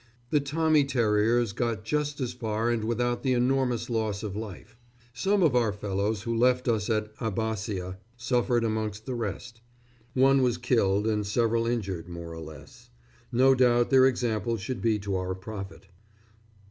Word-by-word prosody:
The 150 - +4
Tommy 155 +1 +2
Terriers 115 -3 +2
got 115 -2 -2
just 150 +4 -1
as 125 -2 -2
far 115 -1 -1
and 115 -2 -1
without 120 +1 0
the 130 -2 +1
enormous 125 -1 +1
loss 110 -4 -2
of 100 -2 -4
life. 110 0 -8 0.4
Some 195 +9 +1
of 150 -7 +3
our 115 -4 +3
fellows 100 +1 -2
who 115 0 -2
left 125 +2 +2
us 110 -3 0
at 110 -1 -1
Abbasia 100 -4 -3 0.2
suffered 120 0 +1
amongst 110 -1 -2
the 130 - -3
rest: 115 +1 -5 0.5
one 135 +1 +5
was 125 -2 +2
killed 110 -5 +1
and 105 -1 +1
several 115 +2 +1
injured 95 -8 -3
more 85 -1 -7
or 80 - -7
less. 80 -1 -12 0.4
No 130 +3 +5
doubt 120 -1 +3
their 130 -1 +7
example 115 -3 -1
should 115 +5 -5
be 115 -2 +2
to 100 -1 -3
our 95 0 -3
profit. 95 0 -8
115 Hz, 160 wpm, -27 LUFS, 105-125 Hz, 0.5 s, their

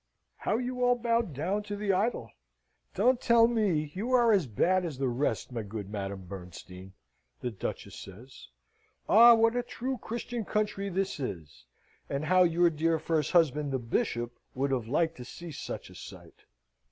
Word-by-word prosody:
"How 215 - 0
you 250 +1 -3
all 245 0 +4
bow 235 -1 +1
down 185 - -2
to 205 0 -6
the 205 -1 0
idol! 210 +6 -1 0.6
Don't 255 0 +3
tell 235 -1 +5
me! 190 -11 0
You 225 +7 -3
are 240 -2 +5
as 190 -9 +3
bad 180 - +2
as 160 -6 -4
the 135 0 0
rest, 130 +2 -1
my 120 -2 -3
good 100 -1 -7
Madame 100 -2 -5
Bernstein!" 90 0 -10 0.5
the 125 - -2
Duchess 100 - -6
says. 110 - -12 0.6
"Ah, 235 +2 +8
what 225 +1 +3
a 245 - +1
true 250 +1 -4
Christian 235 0 -4
country 210 -1 -1
this 195 -2 -2
is! 80 - -6 0.4
and 140 +2 -2
how 185 +3 +4
your 175 0 +4
dear 165 +1 +1
first 155 -2 -1
husband, 150 -4 +3
the 135 - 0
Bishop, 120 0 -2 0.2
would 135 +2 0
have 125 -4 -1
liked 160 +6 0
to 125 - -7
see 170 +7 -9
such 145 - -7
a - - -13
sight!" - - -12
165 Hz, 175 wpm, -29 LUFS, -, 0.6 s, Ah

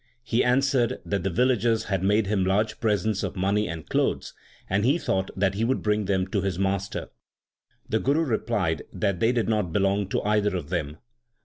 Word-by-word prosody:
He 120 0 +1
answered 125 -1 +2
that 100 -2 -1
the 95 - -1
vil 125 +9 +2
lagers 115 -2 +1
had 95 -4 -2
made 105 +3 +2
him 100 -1 +1
large 105 +4 0
presents 105 -2 0
of - - -4
money 100 +3 +1
and 80 -2 -6
clothes, - - -1 0.3
and 100 +2 +1
he 135 +7 +3
thought 95 - -1
that 95 0 +2
he 105 +3 -1
would 130 +3 0
bring 105 -1 +1
them 95 -1 +1
to 100 0 0
his 95 -2 -2
master. 100 0 -2 0.8
The 110 - 0
Guru 140 +7 +2
replied 120 -8 -1
that 100 -3 -1
they 115 +5 +3
did 120 -3 0
not 105 -6 0
belong 100 +1 +1
to - - -1
either 105 -1 +1
of 80 -4 -7
them. 80 -4 -3
105 Hz, 200 wpm, -25 LUFS, 95-110 Hz, 0.8 s, he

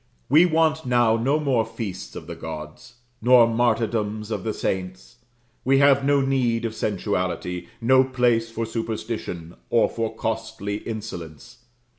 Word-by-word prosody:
We 155 +7 +6
want 160 -1 +2
now 120 -3 +3
no 135 +7 +1
more 135 -6 +2
feasts 100 -5 -7
of - - -7
the - - -7
gods, 80 +10 -8 0.3
nor 120 0 +7
martyrdoms 115 -2 0
of - - -3
the 110 - -1
saints; 95 +3 -4 0.5
we 135 +1 +3
have 140 0 +5
no 140 0 +3
need 125 -4 +1
of 110 - -2
sensuality, 90 -4 -2
no 130 +3 +5
place 125 -3 +1
for 115 0 -3
superstition, 110 -6 -5 0.2
or 115 - +4
for 115 -1 -3
costly 110 -2 -3
insolence. 90 -10 -7
115 Hz, 140 wpm, -24 LUFS, 105-125 Hz, 0.5 s, nor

